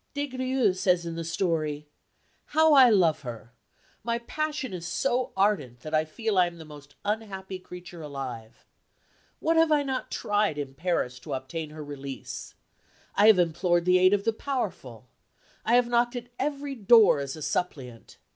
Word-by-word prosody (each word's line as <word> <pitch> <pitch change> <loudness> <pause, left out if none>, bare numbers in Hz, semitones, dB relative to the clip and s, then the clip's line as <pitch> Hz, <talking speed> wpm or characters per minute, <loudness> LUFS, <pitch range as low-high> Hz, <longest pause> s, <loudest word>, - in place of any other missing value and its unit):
Des 285 0 -1
Grieux 255 -5 +1
says 180 -2 +1
in 170 - -4
the 165 0 -4
story, 160 -3 -1 0.6
"How 315 +1 +4
I 265 -3 +8
love 180 -8 +3
her! 120 -2 -9 0.5
My 235 +1 0
passion 295 0 -3
is 170 -2 -5
so 255 +3 0
ardent 150 - +1
that 155 +3 -8
I 155 0 +3
feel 210 +5 -1
I 180 - +5
am 170 0 -9
the 160 - -10
most 145 -1 -14
unhappy 195 -3 -4
creature 180 -1 -10
alive. 130 -6 -7 0.7
What 325 +1 +1
have 325 -1 +4
I 295 -1 +4
not 265 -2 -3
tried 205 -6 0
in 140 -2 -5
Paris 135 -5 -2
to - - -7
obtain 150 +4 -5
her 155 0 -8
release. 140 -2 -7 0.6
I 205 +2 +5
have 220 -3 +8
implored 175 0 +1
the 180 0 +5
aid 185 +2 +5
of 200 - -3
the 225 - +1
powerful. 190 - -4 0.6
I 230 - +3
have 245 -1 +4
knocked 240 +1 +1
at 245 0 -6
every 280 0 -2
door 225 - +5
as 140 -1 -4
a 155 - -8
suppliant. 130 -11 -4
180 Hz, 175 wpm, -27 LUFS, 150-235 Hz, 0.7 s, I